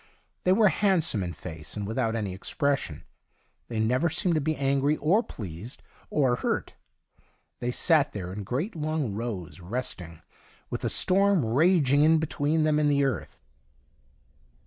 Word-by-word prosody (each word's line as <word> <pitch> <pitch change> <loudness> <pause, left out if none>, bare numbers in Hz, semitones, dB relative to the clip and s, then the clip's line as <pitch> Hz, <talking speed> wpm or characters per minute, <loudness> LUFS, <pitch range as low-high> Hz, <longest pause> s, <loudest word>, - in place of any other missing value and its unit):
They 180 - +4
were 210 +1 +5
handsome 175 - +2
in 90 -2 -4
face, 80 -2 -7
and 105 - -3
without 110 +1 -1
any 105 -4 -3
expression. 115 - -1 0.6
They 115 -2 -4
never 125 +9 +2
seemed 175 +2 +1
to 155 - +1
be 155 +2 -1
angry 140 +2 +1
or 180 +10 +3
pleased, 105 - -9 0.3
or 130 -5 +2
hurt. - - -2 0.8
They 120 - -2
sat 150 +3 +3
there 90 -3 -6
in 105 +1 -5
great 140 - -3
long 155 -7 -2
rows, 100 -6 -5
resting, 90 -5 -5 0.5
with - - -3
the - - -1
storm 195 -3 +3
imaging 145 +3 +3
in 160 +2 +5
between 155 0 0
them 155 -1 +2
and 150 -1 +2
the 140 -1 +2
earth. 110 - -4
135 Hz, 150 wpm, -27 LUFS, 105-155 Hz, 0.8 s, were